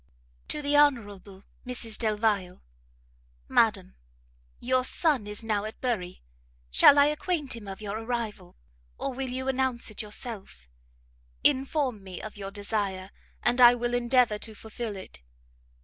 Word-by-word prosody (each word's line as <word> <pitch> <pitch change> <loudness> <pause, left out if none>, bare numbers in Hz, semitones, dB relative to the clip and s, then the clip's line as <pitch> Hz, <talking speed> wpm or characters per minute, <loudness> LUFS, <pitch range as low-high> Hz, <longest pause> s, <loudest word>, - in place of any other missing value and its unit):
To 300 - -1
the 285 +1 +1
Hon. 290 -1 +6 0.7
Mrs 235 -3 -4
Delvile. 210 -5 0 0.8
MADAM, 60 - +2 0.7
Your 255 +1 +1
son 270 -5 +2
is 210 +2 -5
now 210 -2 0
at 215 +1 -7
Bury; 195 - -3 0.5
shall 275 - +7
I 285 - +7
acquaint 300 -2 -1
him 220 -3 -10
of 195 +1 -7
your 210 +1 -4
arrival? 225 -6 -4 0.4
or 275 - -2
will 265 0 -3
you 260 +1 -4
announce 260 -3 0
it 215 - 0
yourself? 210 - -8 0.8
Inform 265 -5 +2
me 185 -2 -8
of 215 - -8
your 195 -1 -6
desire, 200 -2 -3 0.3
and 240 +2 +2
I 240 0 +9
will 240 0 -2
endeavour 240 -3 +2
to 220 0 -6
fulfil 220 0 -6
it. 190 - -10
230 Hz, 140 wpm, -27 LUFS, 205-255 Hz, 0.8 s, I